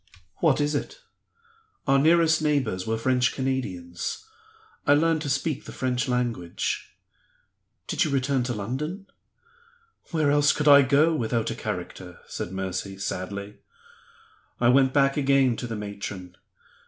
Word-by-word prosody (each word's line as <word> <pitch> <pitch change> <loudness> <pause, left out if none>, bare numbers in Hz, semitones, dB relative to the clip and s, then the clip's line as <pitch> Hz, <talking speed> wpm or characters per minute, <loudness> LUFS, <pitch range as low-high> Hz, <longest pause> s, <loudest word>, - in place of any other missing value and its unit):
"What - - +2
is 145 +1 +1
it?" 145 - -4 0.9
"Our 135 -1 +4
nearest 160 +1 +4
neighbors 130 -12 0
were 110 0 0
French 125 +2 +1
Canadians. 110 - -3 0.6
I 145 - +6
learned 160 +1 +2
to 145 - -3
speak 145 +1 -1
the - - -8
French 125 -2 -1
language." 120 -9 -2 0.9
"Did - - 0
you - - -1
return 135 -1 +1
to 125 - -2
London?" 150 - -4 1.0
"Where 155 -4 +1
else 145 0 +4
could 150 - -1
I 140 -1 +9
go, 140 +5 +3
without 115 -5 -1
a - - -4
character?" 90 -1 -6
said - - -6
Mercy, 95 0 -4
sadly. 100 +2 -5 1.0
"I 120 - +4
went 130 +1 +4
back 140 0 +2
again 135 -3 +3
to 120 - -4
the 115 - -4
matron. 100 -3 -7
130 Hz, 140 wpm, -25 LUFS, 105-145 Hz, 1.0 s, I